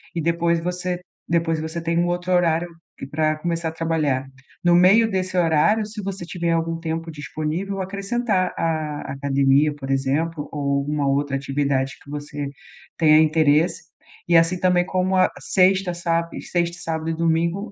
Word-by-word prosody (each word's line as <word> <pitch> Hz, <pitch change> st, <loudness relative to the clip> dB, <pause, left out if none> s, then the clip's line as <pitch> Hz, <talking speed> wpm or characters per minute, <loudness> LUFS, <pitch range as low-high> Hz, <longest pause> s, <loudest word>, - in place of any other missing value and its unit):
E 165 Hz, -, -1 dB
depois 170 Hz, +1 st, +1 dB
você 180 Hz, +1 st, -3 dB, 0.3 s
depois 165 Hz, -1 st, +1 dB
você 160 Hz, +2 st, -4 dB
tem 165 Hz, 0 st, -1 dB
um 175 Hz, -, +2 dB
outro 175 Hz, +1 st, -2 dB
horário 170 Hz, -1 st, +2 dB, 0.3 s
que -, -, -7 dB
pra 155 Hz, +2 st, 0 dB
começar 170 Hz, +1 st, -2 dB
a -, -, -6 dB
trabalhar. 160 Hz, -5 st, -1 dB, 0.4 s
No 175 Hz, 0 st, +4 dB
meio 200 Hz, +6 st, +5 dB
desse 185 Hz, -2 st, -2 dB
horário, 175 Hz, +6 st, +3 dB
se 210 Hz, 0 st, -7 dB
você 195 Hz, -2 st, -5 dB
tiver 170 Hz, -1 st, -2 dB
algum 165 Hz, 0 st, -1 dB
tempo 165 Hz, 0 st, -4 dB
disponível, 155 Hz, +6 st, -4 dB
acrescentar 200 Hz, +1 st, -1 dB
a 155 Hz, -3 st, -2 dB
academia, 140 Hz, +1 st, +2 dB
por 135 Hz, -2 st, -5 dB
exemplo, 145 Hz, +3 st, -1 dB
ou 140 Hz, -1 st, -1 dB
uma 145 Hz, -1 st, -1 dB
outra 140 Hz, 0 st, 0 dB
atividade 135 Hz, -1 st, -1 dB
que -, -, -16 dB
você 145 Hz, -1 st, -5 dB, 0.5 s
tenha 155 Hz, -2 st, +6 dB
interesse. 155 Hz, 0 st, +3 dB, 0.4 s
E 170 Hz, -, +3 dB
assim 165 Hz, +2 st, +3 dB
também, 180 Hz, -1 st, +3 dB
como 185 Hz, +1 st, 0 dB
a 185 Hz, 0 st, +4 dB
sexta, 190 Hz, -1 st, +2 dB
sáb 170 Hz, -1 st, -2 dB
sexta 170 Hz, -1 st, -1 dB
e -, -, -12 dB
sábado 160 Hz, -1 st, -3 dB
e 165 Hz, -, -1 dB
domingo, 170 Hz, +5 st, 0 dB
165 Hz, 165 wpm, -22 LUFS, 150-180 Hz, 0.5 s, tenha